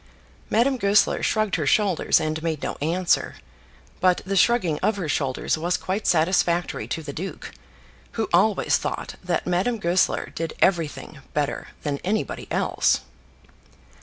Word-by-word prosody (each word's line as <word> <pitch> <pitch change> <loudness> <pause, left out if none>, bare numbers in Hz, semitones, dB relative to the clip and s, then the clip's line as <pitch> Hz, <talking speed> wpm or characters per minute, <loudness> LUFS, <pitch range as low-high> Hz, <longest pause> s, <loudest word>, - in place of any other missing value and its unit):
Madame 255 +4 +2
Goesler 200 0 +3
shrugged 215 -4 +1
her 150 -3 -2
shoulders 195 +2 +3
and 155 0 -2
made 160 -3 -3
no - - -2
answer; 175 +4 +1 0.6
but 185 -1 +3
the 195 +1 -2
shrugging 185 -7 +3
of 215 - +1
her 180 -5 -3
shoulders 145 0 -1
was 175 +3 0
quite 195 +3 -3
satisfactory 175 0 +1
to 160 - -4
the 145 -2 -6
duke, 190 +6 -6 0.6
who 225 - -1
always 195 +4 +3
thought - - -4
that 180 -1 -1
Madame 185 +7 0
Goesler 180 -2 +1
did 165 -1 -4
everything 165 -4 0 0.2
better 145 -1 -1 0.2
than 145 -2 -2
anybody 210 +4 -2
else. - - +1
175 Hz, 140 wpm, -24 LUFS, 160-200 Hz, 0.6 s, Goesler